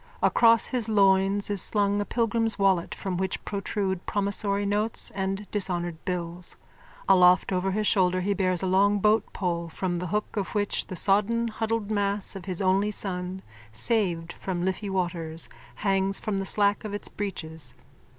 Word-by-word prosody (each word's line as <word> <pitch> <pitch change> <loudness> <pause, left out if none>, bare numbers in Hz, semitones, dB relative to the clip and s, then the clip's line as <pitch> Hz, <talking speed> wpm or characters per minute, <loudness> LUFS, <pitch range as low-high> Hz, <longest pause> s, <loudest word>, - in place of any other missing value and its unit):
Across 230 -1 +5
his 240 -4 -1
loins 195 0 +3
is 200 -3 +1
slung 205 0 +1
a - - -2
pilgrim's 230 -1 +1
wallet 195 -4 +2
from 190 -2 -3
which 190 0 -3
protrude 195 -2 -2
promissory 200 0 0
notes 210 +2 +1
and 195 +1 -3
dishonoured 175 -5 -1
bills. 175 -1 -3 0.5
Aloft 180 -1 +5
over 185 +1 0
his 210 +2 -1
shoulder 185 -3 +2
he 200 +2 +1
bears 185 -2 0
a - - +1
long 200 +2 +3
boatpole 185 -5 0
from 175 +2 -2
the 180 +1 -3
hook 210 +6 -2
of 200 -1 -3
which 205 -1 -1
the 185 - -6
sodden 210 +5 +2
huddled 220 -1 -2
mass 200 -1 -1
of 190 - -8
his 185 0 -3
only 190 +2 +2
son, 185 -2 -4 0.3
saved 170 - 0
from 180 -2 -3
Liffey 190 +2 -2
waters, 170 -4 -3 0.3
hangs 195 -1 +1
from 205 -2 -2
the 195 - -3
slack 205 +1 +1
of 210 -1 -4
its 205 - -4
breeches. 160 -9 -5
195 Hz, 160 wpm, -26 LUFS, 180-205 Hz, 0.5 s, Across